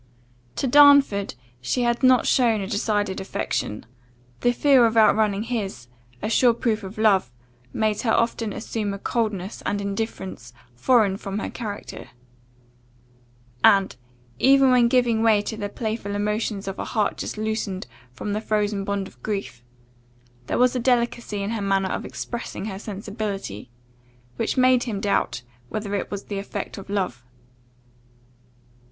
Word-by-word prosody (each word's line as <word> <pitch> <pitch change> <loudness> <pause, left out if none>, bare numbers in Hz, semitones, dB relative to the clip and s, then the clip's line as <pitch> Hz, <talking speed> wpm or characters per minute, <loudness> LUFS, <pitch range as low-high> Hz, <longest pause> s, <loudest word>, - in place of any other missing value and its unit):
To - - -1
Darnford 280 - +6 0.3
she 130 - 0
had 235 0 +1
not 255 -2 +5
shown 235 -4 +3
a 195 - -3
decided 205 -1 -1
affection; 190 - -3 0.5
the 245 - +3
fear 260 -1 +5
of 225 0 -2
outrunning 215 -2 +4
his, 200 - -4 0.3
a - - 0
sure 235 +1 +4
proof 225 -2 0
of 195 +1 -9
love, 200 - +3 0.4
made 215 -1 0
her 230 - +1
often 230 -2 +1
assume 210 -1 -3
a - - -6
coldness 210 -3 -2
and 205 - -1
indifference 195 - -5 0.2
foreign 200 - +3
from 195 0 -5
her - - -4
character; 210 -4 -7 1.5
and, 195 - +5 0.4
even 270 0 +5
when 245 -1 +5
giving 240 -2 +2
way 225 -2 +4
to 220 - -4
the 205 -2 -4
playful 215 -2 -4
emotions 210 -1 -2
of 195 - -5
a - - -3
heart 215 -4 0
just - - -5
loosened 215 -3 -3 0.3
from 200 +11 -5
the 210 - -2
frozen 210 -2 0
bond 200 -1 -2
of - - -19
grief, 195 - -4 0.8
there - - -1
was 250 0 +3
a - - +1
delicacy 235 -4 0
in 200 - -2
her 225 -2 -2
manner 195 -1 +1
of - - -3
expressing 235 -4 -6
her 195 -3 -5
sensibility, 200 - -5 0.7
which - - -1
made 255 -1 +4
him 215 -5 -3
doubt 200 -11 0 0.3
whether 210 -1 -4
it 200 - -2
was 200 -1 -5
the 200 -1 -4
effect 200 0 -6
of 195 - -12
love. 185 -12 -2
210 Hz, 150 wpm, -24 LUFS, 200-230 Hz, 1.5 s, Darnford